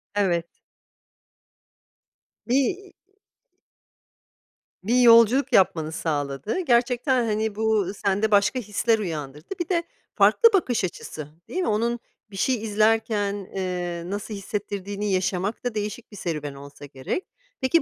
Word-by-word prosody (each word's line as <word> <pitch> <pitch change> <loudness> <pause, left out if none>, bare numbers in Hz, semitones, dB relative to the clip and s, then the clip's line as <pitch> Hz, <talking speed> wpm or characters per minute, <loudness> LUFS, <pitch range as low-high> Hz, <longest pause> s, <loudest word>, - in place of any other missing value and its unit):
Evet. 175 -5 +1 2.0
Bi 245 - +2
iii 370 +8 -1 1.9
bir 240 +5 +3
yolculuk 240 +3 +6
yapmanı 160 -6 +3
sağladı. 145 - -2
Gerçekten 250 -3 +2
hani, 215 -1 -1
bu 215 -3 +1
sende 205 +1 0
başka 205 +5 +3
hisler 225 +1 +1
uyandırdı. 150 -5 -5
Bir 345 - -3
de 340 -2 +1 0.3
farklı 460 - +6
bakış 255 - +1
açısı 155 -4 -5 0.2
değil 370 - -4
mi? 355 - -1
Onun 235 +3 0 0.3
bir 195 - -8
şey 255 +7 +2
izlerken, 215 -1 +1 0.2
eee, 180 -2 -3
nasıl 205 +4 -5
hissettirdiğini 205 0 -4
yaşamak 185 +2 -1
da 245 -3 -2
değişik 210 +2 -4
serüven 150 -6 -4
olsa 140 +1 -11
gerek. 140 - -4 0.4
Peki, 285 +5 +3
210 Hz, 120 wpm, -24 LUFS, 180-235 Hz, 2.0 s, yolculuk